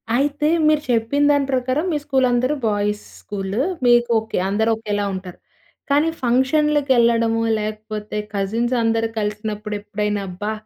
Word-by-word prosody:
అయితే 290 +3 +1 0.2
మీరు 305 -1 +3
చెప్పిన 235 +6 +1
దాని 285 -1 +2
ప్రకారం 260 +5 0
మీ 300 - +1
స్కూల్ 265 -2 +2
అందరూ 255 +5 +1
బాయ్స్ 210 0 -1 0.2
స్కూల్ 195 0 -5 0.3
మీకు 240 0 +4
ఓకె. 220 - -5
అందరూ 220 +3 +1
ఒకేలా 205 -2 -2
ఉంటారు. 185 -1 -7 0.5
కానీ 295 +3 +3
ఫంక్షన్‌లకి 275 +3 +2
ఎళ్ళడము, 230 -1 +2 0.2
లేకపోతే 215 0 -5 0.2
కజిన్స్ 225 +5 -1
అందరూ 225 0 +1
కలిసినప్పుడు 210 0 -3
ఎప్పుడైనా 210 0 -2
అబ్బా! 205 +4 -4
225 Hz, 135 wpm, -21 LUFS, 210-265 Hz, 0.5 s, మీకు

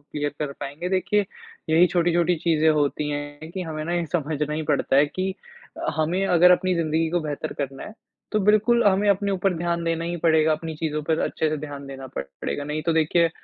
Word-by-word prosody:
Clear 145 0 -4
कर 145 -2 -3
पाएँगे। 145 +6 -5
देखिए 195 +2 +1 0.5
यही 165 +3 +6
छोटी-छोटी 175 0 +2
चीज़ें 160 -1 +2
होती 150 0 0
हैं 145 +2 -6
कि 185 +1 -4
हमें 155 -2 -5
न 165 - -4
ये 175 -1 0
समझना 150 -2 -1
ही 155 - -2
पड़ता - - +1
है 145 +2 +5
कि 185 +5 -3 0.6
हमें 170 +5 +1
अगर 180 -1 +6
अपनी 180 0 +3
ज़िंदगी 160 -1 0
को 175 - +1
बेहतर 155 0 -4
करना 135 -1 -4
है, - - -9 0.4
तो 215 - +2
बिल्कुल 215 +4 +4
हमें 200 0 +3
अपने 200 +1 +1
ऊपर 190 0 0
ध्यान 170 0 -1
देना 165 0 -1
ही 175 +1 -3
पड़ेगा, 160 -1 +3
अपनी 160 +1 -4
चीज़ों 150 -1 -2
पर 160 +1 0
अच्छे 160 - 0
से 155 - -1
ध्यान 145 -1 -7
देना 135 -1 -8
पड़ - - -2 0.2
पड़ेगा। 70 - -3
नहीं 150 +1 -3
तो 165 - +3
देखिए 160 +1 +3
160 Hz, 210 wpm, -24 LUFS, 150-175 Hz, 0.6 s, यही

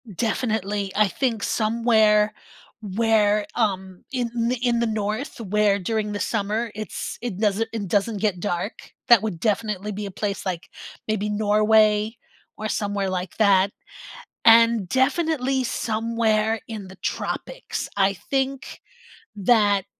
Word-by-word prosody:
Definitely, 210 -3 -1
I 215 0 +4
think 230 +1 -1
somewhere 215 -2 +3 0.5
where, 210 0 +2
um, 190 -5 -1
in 240 -1 -1
in 240 -2 +2
the 235 - +1
North, 215 +6 -3
where 210 -1 +2
during 210 +2 -2
the 205 - -3
summer, 220 +2 -1
it's 215 +1 -5
it 235 -6 -4
doesn't 215 +1 0
it 210 -3 -3
doesn't 205 +3 0
get 200 -3 0
dark. 180 +2 -4 0.2
That 235 -4 +8
would 210 -6 -4
definitely 210 0 -1
be 205 +1 -5
a 200 - -6
place, 200 +1 -3
like, 180 -3 -4 0.4
maybe 210 -1 -1
Norway 215 +1 +3 0.4
or 215 0 -4
somewhere 205 -3 -1
like 185 -1 -4
that, 200 -2 +4 0.7
and 230 -3 +6
definitely 265 - +1
somewhere 225 -1 0
in 215 -4 -7
the 190 - -12
tropics; - - -4
I 195 0 +3
think 270 +7 -3 0.6
that 205 -2 +3
215 Hz, 130 wpm, -23 LUFS, 200-230 Hz, 0.7 s, That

